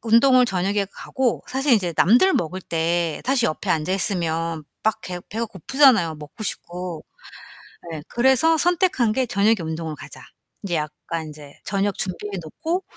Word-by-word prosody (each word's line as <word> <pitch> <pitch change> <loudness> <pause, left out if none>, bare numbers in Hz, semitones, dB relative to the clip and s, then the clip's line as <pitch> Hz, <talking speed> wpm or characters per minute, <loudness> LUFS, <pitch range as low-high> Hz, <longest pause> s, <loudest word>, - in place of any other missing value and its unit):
운동을 250 +2 +5
저녁에 195 +1 0
가고 260 -3 -2
사실 265 0 +2
인제 180 -5 0
남들 250 - +5
먹을 180 +2 -2
때에 165 -1 -1
사실 255 -3 +2
옆에 155 - -4
앉아 160 +3 0
있으면 165 -5 -1 0.2
막 220 - +1
개 180 -1 -5
배가 230 +2 -2
고프잖아요 215 - +3
먹고 150 +7 -10
싶고. 180 -4 -4 0.9
예. 155 - -5
그래서 265 +6 +3
선택한 340 - +2
게 260 +1 +1
저녁에 215 0 +3
운동을 160 -1 -4
가자. - - -11 0.4
이제 180 -3 -2
약간 155 +1 -4
인제 150 -2 -12
저녁 200 0 -1
준비해 195 +2 -3
놓고 330 - -3
195 Hz, 320 characters per minute, -22 LUFS, 165-245 Hz, 0.9 s, 운동을